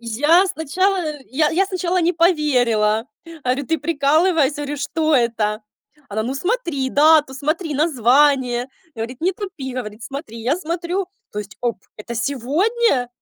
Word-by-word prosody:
Я 295 - +3
сначала, 360 -1 -1
я 300 +3 +2
я 365 +4 +2
сначала 365 -1 -1
не 345 +1 +2
поверила. 250 - +2 0.4
Говорю: 255 +2 0
"Ты 325 0 0
прикалываешься, 300 0 +2
говорю, 290 0 -4
что 310 +2 0
это?" 225 -3 0 0.5
Она: 215 +2 -2
"Ну, 250 +4 -3
смотри 335 - -1
дату, 300 -1 +5
смотри 305 +3 -2
название. 260 -3 +2 0.3
Говорит, 235 +2 -6
не 360 +4 +1
тупи, 365 -10 -6
говорит, 220 -3 -6
смотри." 270 -4 -7
Я 260 +7 +1
смотрю, 350 +2 -3 0.2
то 210 - -4
есть, 210 0 -7
оп, 240 -2 -1 0.2
это 215 +3 -7
сегодня? 280 - 0
285 Hz, 140 wpm, -20 LUFS, 245-335 Hz, 0.5 s, дату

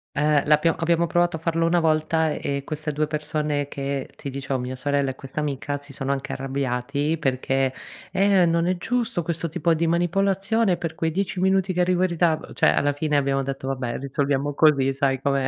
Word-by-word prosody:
Ehm, 150 0 +3
l'abbiamo 150 +2 +3
abbiamo 170 0 +2
provato 175 -1 +1
a - - -13
farlo 165 0 0
una 170 +1 +3
volta, 160 0 +2
e 140 -1 -3
queste 150 +1 -4
2 150 +1 -1
persone 150 -1 -2
che 140 -1 -4
ti 140 - -7
dicevo, 135 0 -3
mia 125 +1 -4
sorella 140 +1 0
e 130 - -5
questa 135 +3 -7
amica, 145 -1 -2
si 140 0 -13
sono 135 +1 -3
anche 140 -1 -3
arrabbiati 135 +3 -2
perché: 135 -1 0 0.4
"Eh, 195 -1 +4
non 170 +1 +1
è 185 - +1
giusto 230 -2 -1
questo 165 0 -3
tipo 170 0 +1
di 165 +1 0
manipolazione, 195 +4 +1
per 165 -2 -4
quei 165 0 -1
10 190 +2 -2
minuti 190 0 +2
che 180 - +1
arrivo 180 0 +2
in 185 - +2
ritardo." 165 -2 0
Cioè - - +4
alla 145 0 +1
fine 150 0 0
abbiamo 135 -1 +1
detto: 135 0 -5
"Vabbè 125 -3 -2
risolviamo 140 +1 -1
così." 140 -3 +4
Sai 135 -1 0
com'è 135 -1 0
150 Hz, 200 wpm, -24 LUFS, 140-170 Hz, 0.4 s, Eh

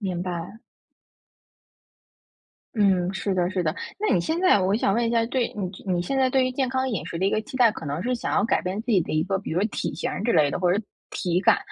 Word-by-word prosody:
明 185 -4 -3
白。 180 +4 -5 2.2
嗯， 190 -3 +2
是 195 0 -2
的， 180 -1 +1
是 185 -1 -1
的。 155 0 -1 0.2
那 425 - +1
你 175 - +3
现 320 - -1
在 370 - +5
我 190 +2 +1
想 195 -3 +1
问 235 +1 +1
一 230 - 0
下， 230 -1 +2
对 250 0 -1
你 190 -4 -3 0.2
你 175 - +1
现 180 +10 -2
在 260 -1 +3
对 265 0 +3
于 255 - 0
健 260 +1 0
康 260 0 0
饮 220 -8 -3
食 165 - -5
的 190 - +1
一 - - +2
个 - - +1
期 220 - -13
待， 245 -4 +6
可 165 - -8
能 145 +4 -3
是 250 +4 0
想 240 - -3
要 - - +3
改 230 - +1
变 185 +3 -3
自 225 - -12
己 205 - +5
的 - - -6
一 155 0 +2
个 195 0 -1
比 195 - -7
如 175 +3 0
说 210 - +2
体 - - -3
型 - - -3
儿 - - -4
之 235 - +2
类 145 -2 +4
的 - - -2
或 180 -1 +2
者 200 - +1
是 220 - -5 0.3
体 175 -1 -1
感， 185 - +4
195 Hz, 295 characters per minute, -25 LUFS, 180-235 Hz, 2.2 s, 待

